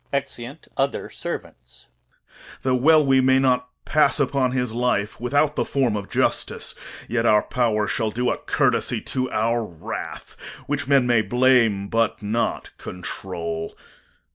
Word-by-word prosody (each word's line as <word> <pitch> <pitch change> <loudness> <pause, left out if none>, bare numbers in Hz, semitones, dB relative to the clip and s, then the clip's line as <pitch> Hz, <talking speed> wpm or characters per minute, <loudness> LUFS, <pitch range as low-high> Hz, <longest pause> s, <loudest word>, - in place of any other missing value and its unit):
[Exeunt 140 0 -5
other 135 0 -1
Servants.] 60 0 -8 0.7
Though 130 - +1
well 155 +4 +5
we 135 -1 +4
may 130 0 +4
not 125 -1 +2 0.2
pass 150 -1 +3
upon 135 -2 +1
his 125 -3 -1
life 115 -3 -1
Without 145 +4 +1
the - - +1
form 130 -6 0
of 100 -1 -5
justice, - - 0 0.3
yet 115 0 0
our 105 -1 +5
power 110 -4 0
Shall 110 +2 -1
do 125 +3 0
a - - -2
court'sy - - +1
to 130 -1 -1
our 115 +2 0
wrath, 85 -7 -7 0.3
which 145 -1 -2
men 135 -2 +4
May 120 -2 +3
blame, 115 -2 +3
but 115 +2 0
not 110 +3 -2
control. 85 -3 -5
125 Hz, 140 wpm, -23 LUFS, 110-135 Hz, 0.7 s, well